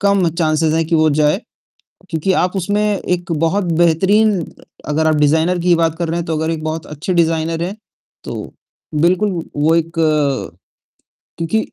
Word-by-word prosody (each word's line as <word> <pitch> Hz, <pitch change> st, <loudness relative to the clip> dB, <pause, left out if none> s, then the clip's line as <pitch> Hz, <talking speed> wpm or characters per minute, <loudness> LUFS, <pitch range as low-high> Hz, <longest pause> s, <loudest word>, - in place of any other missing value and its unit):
कम 200 Hz, -3 st, +3 dB
chances 155 Hz, -1 st, +1 dB
है 165 Hz, -, +1 dB
कि 165 Hz, +1 st, -1 dB
वो 155 Hz, 0 st, +4 dB
जाए। 150 Hz, +5 st, +2 dB, 0.7 s
क्योंकि 165 Hz, +4 st, 0 dB
आप 185 Hz, +2 st, -3 dB
उसमें 205 Hz, +3 st, 0 dB
एक 180 Hz, -4 st, -1 dB
बहुत 165 Hz, +5 st, 0 dB, 0.2 s
बेहतरीन 195 Hz, +4 st, +3 dB, 0.5 s
अगर 160 Hz, +2 st, +1 dB
आप 155 Hz, -, +3 dB
डिज़ाइनर 160 Hz, +4 st, +2 dB
की 180 Hz, -, -1 dB
ही 175 Hz, -, +6 dB
बात 165 Hz, -1 st, +1 dB
कर 170 Hz, -2 st, -2 dB
रहे 170 Hz, +1 st, -1 dB
हैं 170 Hz, -, -5 dB
तो 160 Hz, -, -1 dB
अगर 160 Hz, +1 st, -1 dB
एक 155 Hz, -1 st, -4 dB
बहुत 155 Hz, 0 st, -4 dB
अच्छे 150 Hz, +5 st, -4 dB
डिज़ाइनर 165 Hz, 0 st, +1 dB
हैं, 195 Hz, +4 st, -5 dB, 0.5 s
तो -, -, -6 dB, 0.4 s
बिल्कुल 185 Hz, +6 st, +2 dB, 0.2 s
वो 155 Hz, +3 st, +3 dB
एक 165 Hz, 0 st, -1 dB, 1.5 s
क्योंकि 165 Hz, +7 st, 0 dB
165 Hz, 170 wpm, -17 LUFS, 160-185 Hz, 1.5 s, ही